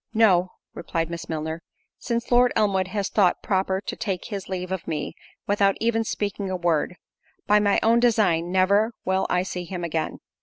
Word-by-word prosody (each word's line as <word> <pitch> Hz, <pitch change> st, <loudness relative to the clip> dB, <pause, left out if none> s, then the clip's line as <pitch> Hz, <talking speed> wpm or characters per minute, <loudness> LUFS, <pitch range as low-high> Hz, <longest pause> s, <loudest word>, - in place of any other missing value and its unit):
"No;" 185 Hz, -5 st, +4 dB, 0.2 s
replied 165 Hz, -1 st, -3 dB
Miss 170 Hz, -1 st, -6 dB
Milner, 160 Hz, +1 st, -3 dB, 0.4 s
"since 235 Hz, 0 st, -3 dB
Lord 245 Hz, 0 st, +5 dB
Elmwood 195 Hz, -3 st, +2 dB
has 200 Hz, +1 st, -2 dB
thought 190 Hz, -4 st, +2 dB
proper 190 Hz, -1 st, 0 dB
to -, -, -5 dB
take 195 Hz, -5 st, -3 dB
his 200 Hz, -4 st, -5 dB
leave 185 Hz, -1 st, -4 dB
of 190 Hz, -3 st, -4 dB
me, 150 Hz, -2 st, -3 dB, 0.3 s
without 200 Hz, -1 st, +2 dB
even 225 Hz, 0 st, +1 dB
speaking 205 Hz, -2 st, -3 dB
a 185 Hz, -, -1 dB
word; 170 Hz, -1 st, 0 dB, 0.5 s
by 210 Hz, 0 st, +5 dB
my 205 Hz, -1 st, +3 dB
own 230 Hz, +2 st, +4 dB
design, 195 Hz, -8 st, +2 dB
never 200 Hz, +5 st, +3 dB
will 190 Hz, +1 st, +1 dB
I 180 Hz, 0 st, +2 dB
see 180 Hz, -1 st, -5 dB
him 175 Hz, 0 st, -6 dB
again." 160 Hz, -2 st, -2 dB
190 Hz, 180 wpm, -24 LUFS, 175-210 Hz, 0.5 s, Lord